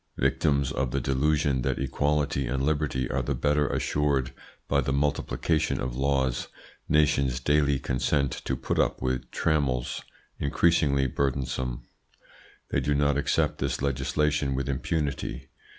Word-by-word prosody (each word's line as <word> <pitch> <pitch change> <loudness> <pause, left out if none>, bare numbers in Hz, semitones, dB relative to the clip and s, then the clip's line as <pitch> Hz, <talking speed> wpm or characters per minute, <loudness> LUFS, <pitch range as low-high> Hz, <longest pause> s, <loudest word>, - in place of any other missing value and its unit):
Victims 70 -2 +1
of 65 -1 -1
the 70 - -1
delusion 70 +1 +1
that - - -1
equality 70 0 0
and 65 +2 -1
liberty 70 -4 0
are 70 - 0
the 70 +2 -2
better 75 +3 +2
assured 70 -4 0 0.3
by - - +2
the - - -2
multiplication 75 +2 0
of 60 -1 -3
laws, 65 -2 0 0.4
nations 70 -4 +3
daily 70 +1 +2
consent 65 +1 0
to 65 - 0
put - - -2
up - - +1
with 65 -1 -2
trammels 70 -6 0 0.4
increasingly 70 -2 +2
burdensome. 65 -2 -2 0.9
They - - +1
do 75 - 0
not 70 0 +2
accept 70 - +1
this - - -2
legislation 70 +1 0
with 70 0 -2
impunity. 70 -2 -2
70 Hz, 135 wpm, -27 LUFS, 65-75 Hz, 0.9 s, nations